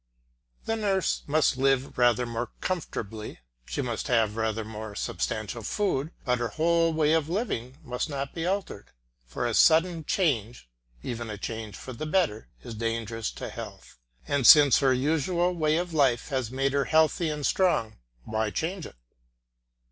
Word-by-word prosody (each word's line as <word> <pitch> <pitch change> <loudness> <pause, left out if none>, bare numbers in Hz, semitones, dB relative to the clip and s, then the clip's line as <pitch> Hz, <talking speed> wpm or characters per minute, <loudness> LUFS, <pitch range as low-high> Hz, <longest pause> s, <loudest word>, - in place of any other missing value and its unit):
The 225 - 0
nurse 200 -4 0
must 150 -2 +2
live 135 0 +1
rather 120 -1 +3
more 120 0 -4
comfortably, 110 - -4 0.3
she 145 - -3
must 120 -3 -3
have 110 -4 +2
rather 110 -1 -1
more 110 -1 -7
substantial 110 +3 -3
food, 155 - -1 0.2
but 125 -2 +1
her 120 - 0
whole 165 +6 +2
way 155 -1 +2
of 160 -1 +1
living 140 - -3
must 125 +5 -3
not 140 -1 -4
be 165 - -4
altered, 185 - -3 0.4
for 65 - -3
a 120 - 0
sudden 165 +4 +4
change, 125 - -1 0.4
even 120 -2 -5
a 105 - -5
change 110 -1 -6
for 130 - -8
the 155 +6 -5
better, 155 - 0
is 120 - -7
dangerous 115 0 -3
to - - -6
health, - - -10 0.3
and 140 -4 +2
since 145 -3 +8
her 135 -2 +3
usual 160 +7 +1
way 155 -2 +1
of 175 -1 -3
life 135 -5 +2
has 130 -5 -1
made 135 +2 -1
her 140 -1 +1
healthy 160 +1 +2
and 150 -2 -3
strong, 170 - +1 0.3
why 110 0 -1
change 165 - -3
it? - - -15
135 Hz, 165 wpm, -27 LUFS, 115-160 Hz, 0.4 s, since